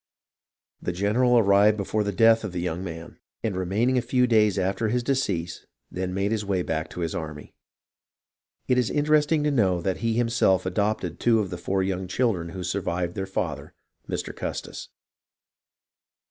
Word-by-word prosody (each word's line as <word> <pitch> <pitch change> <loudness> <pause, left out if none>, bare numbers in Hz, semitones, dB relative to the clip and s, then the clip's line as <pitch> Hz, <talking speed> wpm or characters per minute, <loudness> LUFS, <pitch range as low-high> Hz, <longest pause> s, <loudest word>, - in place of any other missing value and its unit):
The 90 - -2
general 115 +7 +2
arrived 105 0 +5
before 105 +1 -1
the 100 - -1
death 115 +3 +4
of 100 -4 -5
the 90 - -3
young 85 0 -3
man, 85 -2 -8 0.2
and 110 -4 -1
remaining 105 +8 +1
a - - -1
few 125 +1 +2
days 105 -5 +3
after 95 +3 0
his 120 +3 0
decease, 100 -11 -2 0.2
then 90 0 -3
made 100 +2 -1
his 110 -1 -1
way 95 -3 -1
back 80 -1 -3
to 90 - -7
his 85 -1 -2
army. 75 -2 -6 1.1
It 125 0 +3
is 125 - +1
interesting 150 +1 +2
to 150 - +1
know 95 -9 +2
that 95 +2 -1
he 115 -1 -1
him 120 0 +1
self 95 -5 +2
adopted 95 -2 -1
two 115 -2 +3
of 100 -4 -2
the 90 - -4
four 95 +2 0
young 95 -1 -2
children 90 -5 0
who 90 +1 -6
survived 85 -1 -2
their 95 +1 -4
father, 95 - -4 0.3
Mr. - - -4
Custis. - - -6
100 Hz, 175 wpm, -25 LUFS, 90-115 Hz, 1.1 s, arrived